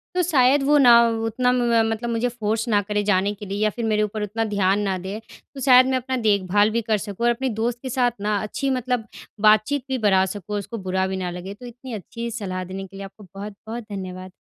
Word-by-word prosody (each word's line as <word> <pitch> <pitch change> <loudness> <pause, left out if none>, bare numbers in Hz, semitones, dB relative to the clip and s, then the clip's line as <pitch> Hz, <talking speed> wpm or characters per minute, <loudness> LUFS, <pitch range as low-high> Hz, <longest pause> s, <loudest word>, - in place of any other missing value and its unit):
तो 365 - +3
शायद 275 -4 +3
वो 295 +2 +4
ना, 240 -4 +8
उतना 225 +2 0
म - - +1 0.2
म 225 -1 +4
मतलब 230 +2 -3
मुझे 235 +1 0
फ़ोर्स 225 -1 -2
ना 205 -2 +3
करें 210 +1 -2
जाने 200 0 +2
के 205 +1 -10
लिए 200 +1 -4
या 215 - +3
फिर 230 +2 -4
मेरे 215 -1 +2
ऊपर 210 0 -3
उतना 220 +2 -2
ध्यान 195 0 +2
ना 195 -2 -1
दें, 190 +4 -6 0.3
तो 275 - -9
शायद 255 -1 +7
मैं 260 -1 +1
अपना 260 +1 -3
देखभाल 205 -2 +2
भी 235 - 0
कर 215 -1 0
सकूँ 205 +2 -4
और - - +5
अपने 260 +2 -2
दोस्त 230 +2 -2
के 260 - -5
साथ 245 -1 +2
ना 210 0 0
अच्छी 270 +6 -2
मतलब 250 -3 -1 0.3
बातचीत 215 +6 +4
भी 265 - 0
बढ़ा 190 -1 +4
सकूँ 205 +1 -6
और 205 - 0
उसको 230 +4 -7
बुरा 190 0 +1
भी 190 0 -3
ना 180 -1 -3
लगे। 180 +3 -7
तो 220 +5 -13
इतनी 245 +1 -9
अच्छी 230 +3 -6
सलाह 190 -5 -4
देने 190 +1 -7
के 195 - -16
लिए 195 0 -7
आपको 200 +2 -14
बहुत-बहुत 210 +3 -7
धन्यवाद। 185 -1 -6
215 Hz, 245 wpm, -23 LUFS, 200-240 Hz, 0.3 s, ना